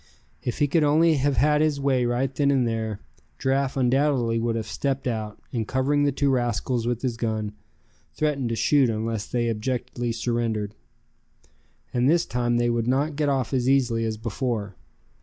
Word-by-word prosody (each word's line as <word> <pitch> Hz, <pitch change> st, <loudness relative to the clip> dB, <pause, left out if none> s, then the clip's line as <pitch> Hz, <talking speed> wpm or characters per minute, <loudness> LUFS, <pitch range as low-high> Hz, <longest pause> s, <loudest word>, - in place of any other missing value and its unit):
If 120 Hz, -, -3 dB
he 145 Hz, -, +2 dB
could 155 Hz, +2 st, +2 dB
only 155 Hz, +2 st, +4 dB
have 140 Hz, -1 st, +1 dB
had 150 Hz, +4 st, +3 dB
his 155 Hz, -2 st, +1 dB
way 130 Hz, -3 st, +1 dB
right 125 Hz, +2 st, 0 dB
then 140 Hz, +1 st, +1 dB
and 130 Hz, -4 st, +2 dB
there, 110 Hz, -2 st, -3 dB, 0.4 s
Giraffe 135 Hz, 0 st, 0 dB
undoubtedly 130 Hz, -2 st, +2 dB
would 115 Hz, 0 st, 0 dB
have 110 Hz, -1 st, -2 dB
stepped 135 Hz, +4 st, -2 dB
out, 110 Hz, -4 st, -3 dB
and 115 Hz, -3 st, -2 dB
covering 145 Hz, +3 st, +1 dB
the 145 Hz, -, +2 dB
two 140 Hz, +1 st, +1 dB
rascals 120 Hz, -1 st, 0 dB
with 120 Hz, 0 st, -2 dB
his 120 Hz, -3 st, -1 dB
gun, 110 Hz, -3 st, -2 dB, 0.6 s
threatened 145 Hz, -5 st, 0 dB
to 115 Hz, -, -1 dB
shoot 130 Hz, +3 st, +3 dB
unless 110 Hz, -1 st, -2 dB
they 120 Hz, -1 st, -1 dB
abjectly 120 Hz, +1 st, -2 dB
surrendered. 115 Hz, -3 st, -1 dB, 1.2 s
And 125 Hz, +2 st, +2 dB
this 170 Hz, +2 st, +3 dB
time 120 Hz, -1 st, 0 dB
they 120 Hz, 0 st, +2 dB
would 120 Hz, -1 st, -1 dB
not 140 Hz, +4 st, +1 dB
get 150 Hz, 0 st, +1 dB
off 135 Hz, -3 st, -1 dB
as 130 Hz, -1 st, +1 dB
easily 125 Hz, -4 st, +2 dB
as 110 Hz, -1 st, -2 dB
before. 110 Hz, -3 st, -3 dB
125 Hz, 175 wpm, -25 LUFS, 115-140 Hz, 1.2 s, only